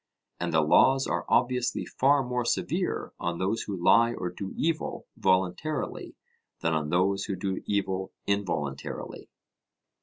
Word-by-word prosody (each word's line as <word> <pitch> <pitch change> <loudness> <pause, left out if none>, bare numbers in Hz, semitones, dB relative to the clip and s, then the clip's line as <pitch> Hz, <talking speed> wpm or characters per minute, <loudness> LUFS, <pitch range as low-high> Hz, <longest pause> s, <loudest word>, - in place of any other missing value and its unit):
And - - -2
the 80 - +4
laws 135 - +5
are - - -2
obviously 125 0 +1
far 140 +1 +3
more 125 -1 -1
severe 120 - -1
on 85 0 -2
those 100 +6 0
who 100 -2 -4
lie 115 +7 +4
or 90 - -3
do 95 +2 -6
evil, 160 0 -1
voluntarily, 95 - -1 0.5
than 80 - +1
on 75 -1 -1
those 95 +3 +1
who 100 - -2
do 95 0 -3
evil 95 -2 -1
involuntarily. 95 -9 -3
100 Hz, 140 wpm, -28 LUFS, 90-125 Hz, 0.5 s, laws